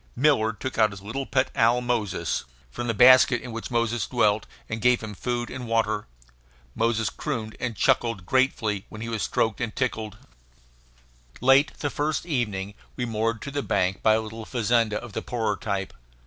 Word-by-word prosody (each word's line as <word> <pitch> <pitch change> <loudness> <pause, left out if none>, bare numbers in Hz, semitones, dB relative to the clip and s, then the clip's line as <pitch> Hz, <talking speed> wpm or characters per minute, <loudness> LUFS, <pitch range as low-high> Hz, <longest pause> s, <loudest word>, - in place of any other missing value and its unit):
Miller 125 -5 +3
took 115 +4 -5
out 110 -1 +5
his 100 -1 -10
little 130 +6 -4
pet 130 0 +1
owl 115 +2 +4
Moses, 120 -5 -1 0.3
from 120 0 -4
the 115 - +1
basket 125 +2 +7
in 125 - -8
which 115 0 -6
Moses 115 -2 0
dwelt, 110 -4 +2 0.2
and 110 0 -4
gave 125 +1 +4
him 105 -1 -6
food 120 +3 -3
and 125 -2 -6
water. 110 -2 0 0.7
Moses 115 -2 0
crooned 115 -8 -4
and 120 -3 -3
chuckled 115 -5 +1
gratefully 110 -5 +1
when 105 - -9
he 115 - -4
was 115 -2 -2
stroked 110 +3 0
and 115 -3 -3
tickled. 110 -5 -2 1.2
Late 135 +3 +4
the 145 - -1
first 150 +1 -1
evening 105 - -2 0.2
we 125 - -2
moored 115 0 -1
to 140 - -6
the 145 0 -1
bank 95 -6 0
by 110 -1 +5
a 110 - +1
little 110 +1 -7
fazenda 115 -2 +1
of 120 -4 -10
the - - -2
poorer 110 -4 -1
type. 100 -1 -3
115 Hz, 180 wpm, -25 LUFS, 110-125 Hz, 1.2 s, basket